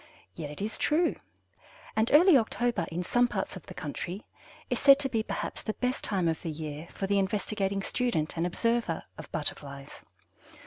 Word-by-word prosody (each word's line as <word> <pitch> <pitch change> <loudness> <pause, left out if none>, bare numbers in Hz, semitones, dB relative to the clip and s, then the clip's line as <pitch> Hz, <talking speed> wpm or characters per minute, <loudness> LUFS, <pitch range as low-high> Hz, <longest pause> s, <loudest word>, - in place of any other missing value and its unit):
Yet 145 - -6
it 150 +7 -6
is 220 - -4
true, 330 +3 +2 0.8
and 220 +1 +2
early 335 +3 +8
October, 240 -1 +1
in 175 +2 -2
some 245 +6 +3
parts 205 -4 -3
of 185 - -10
the - - -9
country, 175 +6 -5 0.4
is - - -1
said 275 -1 +8
to 270 - +2
be 225 -3 +1
perhaps - - -4
the 215 - -3
best 250 +1 -1
time 185 -4 +1
of 160 -1 0
the 165 - -4
year 155 0 -6
for 195 - -3
the 200 +1 +2
investigating 195 0 -1
student 195 -13 0
and 165 +1 0
observer 230 -2 0 0.2
of - - -9
Butterflies. 140 -2 -5
200 Hz, 180 wpm, -29 LUFS, 165-240 Hz, 0.8 s, early